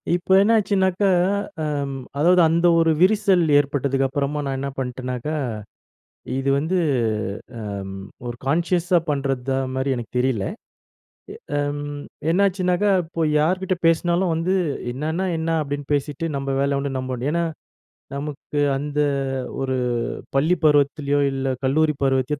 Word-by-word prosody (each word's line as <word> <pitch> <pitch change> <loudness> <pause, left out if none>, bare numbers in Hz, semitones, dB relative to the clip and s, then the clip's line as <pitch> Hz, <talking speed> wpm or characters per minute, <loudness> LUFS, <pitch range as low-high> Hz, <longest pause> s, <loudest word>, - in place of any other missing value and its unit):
இப்ப 175 - -6
என்னாச்சுனாக்க, 200 -3 +2 0.6
அ - - -1 0.5
அதாவது 175 +4 +5
அந்த 170 +2 +3
ஒரு 165 0 +4
விரிசல் 195 -2 +4 0.2
ஏற்பட்டதுக்கு 140 -1 0
அப்பறமா 145 +2 -2
நான் 135 -1 -2
என்ன 140 0 -3
பண்ணிட்டனாக்க, 125 0 -4 1.1
இது 135 +1 0
வந்து 160 +6 -1 1.1
ம் 95 - -7 0.3
ஒரு 120 0 -4
கான்ஷியஸ்ஸா 175 +3 +2
பண்றதா 135 -2 -1 0.2
மாரி 130 0 0
எனக்கு 120 -2 -7
தெரியல, 125 -6 +1 1.1
அ - - +2
எம் 145 0 -2 0.5
என்னாச்சுனாக்க, 185 0 +2 0.2
இப்போ 165 0 -5 0.2
யார்கிட்ட 185 +4 +1
பேசுனாலும் 170 +1 +2
வந்து, 180 +4 0 0.4
"என்னன்னா 160 +7 -2
என்னா?" 165 0 0
அப்டின்னு 145 0 -5
பேசிட்டு 145 +3 -1
நம்ப 135 0 -4
வேல 140 0 +1
உண்டு 140 -1 -3
நம்ப 130 0 -3
உண்டு 125 +4 -2
ஏன்னா, 170 0 +1 0.7
நமக்கு 145 +1 -4 0.2
அந்த 145 +1 -3 0.6
ஒரு 130 -1 -1 0.6
பள்ளி 165 +6 +3
பருவத்திலோ, 145 -1 +3
இல்ல 135 -1 -1
கல்லூரி 150 +2 +2
பருவத்தையோ 135 +2 +1
145 Hz, 125 wpm, -22 LUFS, 135-175 Hz, 1.1 s, அதாவது